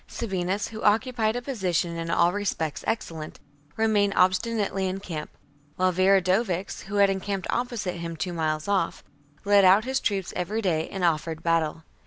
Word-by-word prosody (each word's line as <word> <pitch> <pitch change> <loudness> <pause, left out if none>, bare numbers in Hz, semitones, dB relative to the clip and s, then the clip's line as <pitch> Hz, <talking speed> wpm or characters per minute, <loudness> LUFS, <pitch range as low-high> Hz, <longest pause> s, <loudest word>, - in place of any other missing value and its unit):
Sabinus, 195 -2 -2
who 220 -1 -8
occupied 220 +1 +2
a 245 - -3
position 185 - -1
in 165 0 -4
all 170 +1 +3
respects 185 -7 -2
excellent/ 160 -8 -4 0.4
remained 210 -2 +2
obstinately 190 +1 +1
in 190 +1 -4
camp; 160 -6 -6 0.5
while 185 0 +2
Viridovix, 190 +1 +1
who 200 +2 -6
had 200 -1 +5
encamped 195 -1 -3
opposite 235 -7 -2
him, 170 -1 -5
two 180 +2 -3
miles 155 -1 -1
off, 195 -4 0 0.4
led 200 0 +5
out 195 +4 +6
his 265 +1 0
troops 195 -6 -2
every 195 +5 -2
day 165 -4 0
and 190 -2 -5
offered 165 -1 0
battle. 165 -1 0
190 Hz, 160 wpm, -26 LUFS, 170-205 Hz, 0.5 s, out